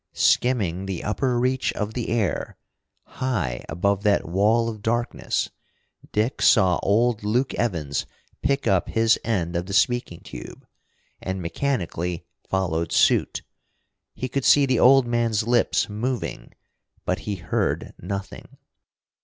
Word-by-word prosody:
Skimming 95 -7 +2
the 95 -3 -4
upper 120 +3 0
reach 130 +1 +1
of 105 +1 -3
the 120 -1 -3
air, 110 -9 -1 0.5
high 90 - -3
above 100 +4 0
that 105 -5 +2
wall 105 +6 +2
of 110 -2 -5
darkness, 120 +2 -1 0.6
Dick 110 +4 0
saw 95 -7 +5
old 110 +2 +2
Luke 120 +6 0
Evans 80 -11 -2 0.3
pick 140 0 0
up 95 -2 +2
his 115 0 +3
end 90 -6 -1
of 85 +1 -2
the 100 - -5
speaking 120 -5 +1
tube, - - -10 0.6
and 95 0 -3
mechanically 90 - -2 0.2
followed 85 -4 -1
suit. - - +2 0.7
He 130 - -3
could 135 +1 -2
see 145 +1 +6
the 130 -3 +1
old 135 0 +6
man's 115 -2 0
lips 120 0 +2
moving. 120 +4 -4 0.5
But - - 0
he 100 - -1
heard 85 -2 -2
nothing! 100 -1 -7
105 Hz, 130 wpm, -24 LUFS, 90-120 Hz, 0.7 s, see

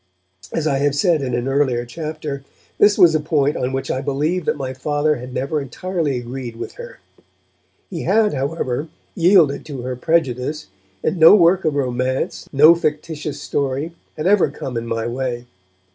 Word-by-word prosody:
As 160 - -2
I 140 -3 +1
have 145 0 +1
said 165 0 +2
in 125 -3 -2
an 120 +2 -2
earlier 135 -3 +1
chapter, 150 +1 -6 0.4
this 205 0 +5
was 175 -5 +6
a 155 - +2
point 150 -2 +1
on 125 - -2
which 135 0 -3
I 130 - -2
believe 150 +5 -1
that - - 0
my 130 -2 -4
Father 145 +3 0
had 125 +1 -8
never 140 +4 -2
entirely 155 0 -2
agreed 120 -1 -6
with - - -6
her. 485 0 -10 0.9
He 170 -5 -6
had, 210 +3 +2
however, 140 0 -2 0.3
yielded 170 -5 +4
to 135 -5 -6
her 130 0 -3
prejudice; 150 0 -1 0.4
and 185 - -1
no 160 +5 +9
work 180 -1 +4
of 155 -2 +1
romance, 130 -1 -2
no 150 +4 +7
fictitious 155 -2 -3
story, 140 +3 -2 0.3
had 155 - -3
ever 195 -4 +4
come 135 -3 -7
in 115 0 -3
my 115 0 -2
way. 120 0 -3
145 Hz, 175 wpm, -20 LUFS, 130-165 Hz, 0.9 s, no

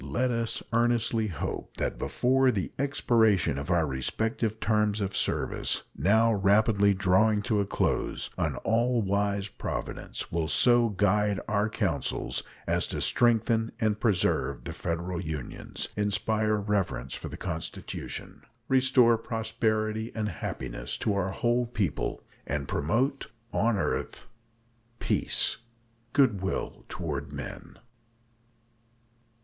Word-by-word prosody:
Let 120 - 0
us 115 -1 -2
earnestly 115 -1 +2
hope 85 -8 -5
that - - -2
before 130 +1 +2
the 100 -7 -1
expiration 110 - +2
of 70 +4 -6
our 85 -3 +3
respective 110 - -1
terms 105 -1 +1
of 100 -1 -2
service, - - -1
now 110 +3 +4
rapidly 100 0 +4
drawing 100 +3 +3
to 110 -3 +1
a 100 - 0
close, - - -1
an - - -1
all 120 +1 +2
wise 100 0 0
Providence - - -5
will 80 -1 0
so 120 +5 +4
guide 105 0 +2
our 105 +1 +1
counsels - - -1 0.2
as - - +1
to - - -3
strengthen 115 -1 +2
and 110 -3 +1
preserve 90 - +1
the - - -5
Federal 85 +1 -3
Unions, 75 -6 -5
inspire 105 +1 +1
reverence 100 - -1
for - - -6
the - - -7
Constitution, 80 0 -5 0.3
restore 130 -3 +4
prosperity 110 -1 -1
and 110 -2 -1
happiness 60 -7 -5
to 105 - 0
our 95 -1 0
whole 120 +5 +1
people, 100 - -2 0.2
and 70 -1 -2
promote 130 - 0 0.3
"on 115 -2 +2
earth 90 - -2 0.7
peace, - - +1 0.5
good 115 -9 +3
will 95 - -3
toward - - -4
men." - - -8
105 Hz, 120 wpm, -28 LUFS, 95-115 Hz, 0.7 s, now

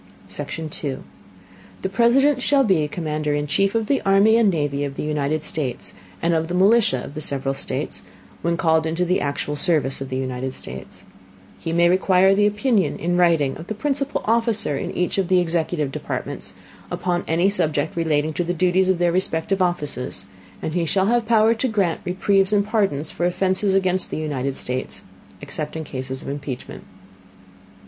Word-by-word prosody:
Section 160 -1 -5
2. 145 -3 -3 0.8
The 190 - 0
President 255 +6 +3
shall 275 +1 +3
be 180 - +2
Commander 150 -2 -2
in 145 0 -1
Chief 195 +7 +1
of 225 -1 +1
the 275 +5 +1
Army 200 +3 +4
and 230 -3 +4
Navy 145 -5 -1
of 140 -1 -4
the - - -4
United 150 0 -1
States, 130 -6 -2 0.3
and 170 - +2
of 160 0 0
the 175 - -3
Militia 200 - +4
of - - -9
the 155 - -5
several 135 -2 0
States, - - -3 0.4
when 170 0 0
called 160 -2 +2
into 165 +3 0
the 180 +1 +1
actual 145 +1 -2
Service 145 -4 +1
of 135 - -5
the 130 - -2
United 130 0 -3
States; 65 +1 -9 0.6
he 165 - -4
may 170 +1 +4
require 185 +1 +4
the 205 +1 +4
Opinion, 210 - +1
in 175 +2 -1
writing, 165 -6 +3
of 160 - -10
the 215 - -4
principal 275 +4 -1
Officer 225 -7 +1
in - - -3
each 180 +2 0
of 190 - 0
the 185 0 +4
executive 165 -4 -1
Departments, - - -4 0.3
upon 175 -1 -1
any 170 +4 +2
Subject 155 -5 -1
relating 155 -2 0
to 175 - -1
the 175 +1 -2
Duties 185 +2 +2
of 190 - +3
their 175 0 +2
respective 185 +1 0
Offices, 150 - -1 0.4
and 155 - -2
he 175 0 +1
shall 190 +4 +2
have 235 +1 +1
Power 225 -1 +5
to 235 +3 -1
grant 200 -8 0
Reprieves 190 +2 +2
and 200 -1 +3
Pardons 200 -9 0
for 175 - 0
Offenses 190 +2 +1
against 185 -1 +1
the - - -4
United 140 -3 -2
States, 125 +1 -4 0.4
except 155 - -4
in 160 - -3
Cases 130 -2 -6
of - - -10
impeachment. 140 -2 -6
175 Hz, 185 wpm, -22 LUFS, 150-195 Hz, 0.8 s, Power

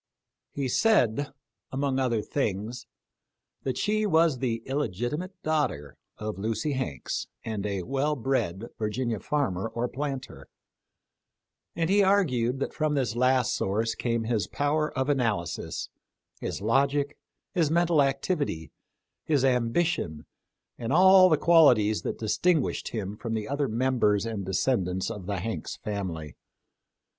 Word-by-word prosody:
He 140 -2 -2
said, 145 - +2 0.4
among 135 0 0
other 120 -5 +1
things, 115 -1 -3 0.7
that 130 -2 -2
she 215 +1 +1
was 160 -6 +3
the 115 -3 -1
illegitimate 140 - -2
daughter 145 - -1 0.2
of 105 -2 -5
Lucy 110 +7 -1
Hanks 130 - -3 0.2
and 105 -2 -3
a 100 -3 -2
well 140 +6 0
bred 115 -7 -1
Virginia 115 +1 -1
farmer 115 -10 -1
or 120 +2 -2
planter; 135 0 -5 1.3
and 165 -1 0
he 200 +3 +4
argued 135 -11 +2
that - - -2
from 155 -1 0
this 125 -5 0
last 125 0 +3
source 110 +4 0
came 115 -1 -1
his 110 -2 0
power 150 +2 0
of 130 +1 +1
analysis, 115 -11 -1 0.5
his - - -4
logic, 140 +6 +1 0.4
his 170 -6 +2
mental 170 -1 +3
activity, 135 - -1 0.5
his 145 -4 +2
ambition, 125 - 0 0.5
and 115 +1 -3
all 185 +3 +7
the 155 - +4
qualities 125 -12 +5
that - - -3
distinguished 155 +7 +1
him 105 -3 -4
from 115 +1 -4
the 110 -1 -3
other 140 0 0
members 115 -3 +1
and 105 -5 -4
descendants 95 -3 0
of 95 -3 -7
the 100 -1 -1
Hanks 110 +3 -4
family. 90 -8 -5
125 Hz, 130 wpm, -27 LUFS, 110-145 Hz, 1.3 s, all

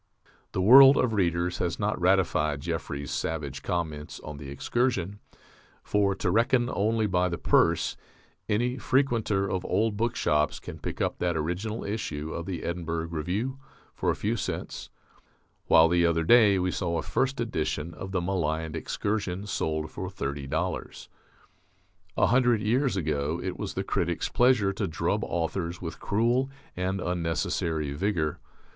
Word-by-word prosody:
The 95 - 0
world 135 +6 +9
of 125 -3 +2
readers 90 -3 0
has 85 -2 -1
not 105 -2 -1
ratified 85 -6 +2
Jeffrey's 70 0 -4
savage 70 -4 -3
comments 80 -5 -3
on 75 -1 -8
"The 70 -1 -8
Excursion," 100 - -1 0.6
for 100 -1 +1
(to 95 -2 -1
reckon 120 +3 +2
only 110 +2 +1
by 90 -2 +1
the 85 - -3
purse) - - +2 0.5
any 120 +5 0
frequenter 115 -7 +1
of 95 -1 -2
old 105 +2 0
bookshops 75 -10 +1
can - - -9
pick - - -5
up - - -1
that 85 -2 0
original 90 +8 -3
issue 80 -8 -4
of 85 - -5
the 95 -3 -4
Edinburgh 85 -1 -3
Review 95 - -3 0.3
for - - -1
a - - +2
few 110 +3 -1
cents, 110 - -5 0.8
while 80 - +7
the 85 +1 +3
other 85 0 +1
day 105 0 +6
we 90 0 0
saw 85 -3 -1
a 80 - -2
first 135 - -1
edition 85 -7 -2
of 95 +4 -7
the 95 -2 0
maligned 80 -3 -1
"Excursion" 100 +3 -2
sold 80 -6 -2
for 95 - -5
thirty 70 -6 -4
dollars. 80 +6 -3 1.1
A - - +5
hundred 120 0 +3
years 120 +1 +1
ago 75 -1 -1
it 95 -1 -4
was - - -4
the - - -1
critic's 85 0 -1
pleasure 120 -6 +3
to - - -2
drub 80 - -1
authors 85 +1 -2
with 85 -2 -6
cruel 120 +5 +1 0.3
and 95 +1 -1
unnecessary 80 -3 -1
vigour. 80 -2 -1
90 Hz, 150 wpm, -27 LUFS, 80-105 Hz, 1.1 s, world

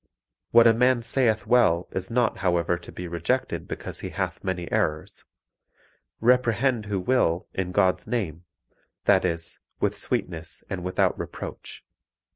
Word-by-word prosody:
What 115 0 +6
a 115 - +7
man 125 +1 +3
saith 115 -2 +2
well 90 -8 +3
is 95 0 -3
not 120 0 +1
however 85 -2 +1
to 85 - -10
be 90 - -7
rejected 85 -1 -2
because - - -5
he - - -5
hath - - -4
many 90 -3 -3
errors; 75 0 -1 0.9
reprehend 120 -1 +2
who 100 -2 -1
will, 95 -5 +1
in 90 -1 -2
God's 95 +1 +2
name, 90 -8 -3 0.6
that 95 - +4
is 85 -2 -3 0.2
with - - 0
sweetness 85 -2 -2
and 95 -2 -3
without 90 0 +1
reproach. - - -7
95 Hz, 140 wpm, -25 LUFS, 85-115 Hz, 0.9 s, a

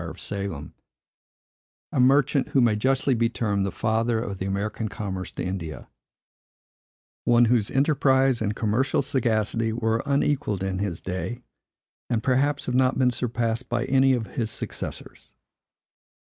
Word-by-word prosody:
of 80 - -10
Salem; 100 -8 -5 1.2
a - - -1
merchant, 135 +1 +4
who 135 - +1
may 115 -4 +4
justly 135 +4 +1
be 115 -1 +2
termed 105 -4 -1
the - - -3
father 115 +4 0
of 100 -4 -5
the 95 - -2
American 105 +3 -2
commerce 95 -3 -5
to - - -5
India; 90 -4 -5 1.4
one 120 0 +5
whose 115 -2 +2
enterprise 135 -3 +2
and 105 -1 -1
commercial 115 +7 +1
sagacity 115 -3 0
were 115 0 0
unequalled 140 -8 0
in 95 -1 -2
his 100 -4 -3
day, 105 +7 -4 0.7
and, 115 -2 0
perhaps, 140 +3 +1
have 125 - -2
not 130 +1 +3
been 125 -1 +3
surpassed 120 0 -2
by - - 0
any 135 0 +4
of 120 -3 -1
his 110 +2 -3
successors. - - -7
115 Hz, 145 wpm, -25 LUFS, 105-130 Hz, 1.4 s, one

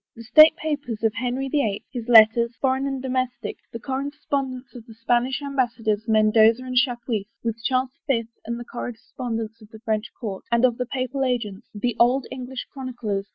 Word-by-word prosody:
The 230 - -10
State 310 +7 +8
Papers 285 -9 -4
of 220 -1 +2
Henry 250 +3 -2
the 290 +2 +1
Eighth, 205 -2 -2
his 240 -2 -5
letters, 235 0 +6
foreign 265 0 +1
and 270 -1 -3
domestic; 255 -1 -2
the - - -5
correspondence 270 -1 -3
of 245 - -10
the 225 - -13
Spanish 245 +4 0
ambassadors, 235 -6 -1
Mendoza 220 +2 +4
and 255 0 -5
Chapuis, 240 -5 0 0.2
with 230 -1 -3
Charles 255 0 +1 0.2
the 275 - +3
Fifth, 230 +1 -23
and 235 +1 -4
the 240 - -7
corres 240 -1 -8
pondence 225 -3 -4
of 215 - -15
the 220 - -12
French 220 0 0
court, 200 -5 -5
and 235 +1 +4
of 245 -1 +1
the 250 - -1
Papal 260 +1 -2
agents, 230 -5 -2
the 235 +3 -1
old 250 +3 +4
English 255 0 -6
chroniclers. 240 -7 -4
245 Hz, 190 wpm, -24 LUFS, 225-260 Hz, 0.2 s, State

